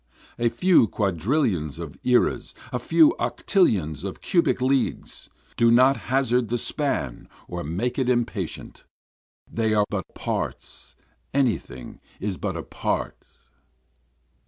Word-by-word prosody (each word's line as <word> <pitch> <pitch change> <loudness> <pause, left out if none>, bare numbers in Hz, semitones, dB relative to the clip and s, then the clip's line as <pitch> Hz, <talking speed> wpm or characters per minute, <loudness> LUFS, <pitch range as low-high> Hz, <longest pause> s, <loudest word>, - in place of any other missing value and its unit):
A 120 0 +3
few 120 +2 +4
quadrillions 95 - 0
of 80 -4 -7
eras, 125 -1 +1 0.2
a - - 0
few 315 0 +4
octillions 90 - +1
of 100 -1 -5
cubic 170 -6 +1
leagues, 130 +1 -1 0.3
do 115 - +5
not 130 +4 +6
hazard 125 -3 +1
the 120 - 0
span 120 - -2 0.2
or 85 0 -5
make 110 - -2
it 130 -1 +1
impatient, 120 -8 -2 0.6
They 110 -1 0
are 105 -1 +3
but 95 -5 -4
parts, - - -4 0.4
any 130 -6 +3
thing 65 -1 -11 0.2
is 100 -3 -3
but - - -3
a - - -5
part. - - -3
115 Hz, 125 wpm, -24 LUFS, 90-130 Hz, 0.6 s, not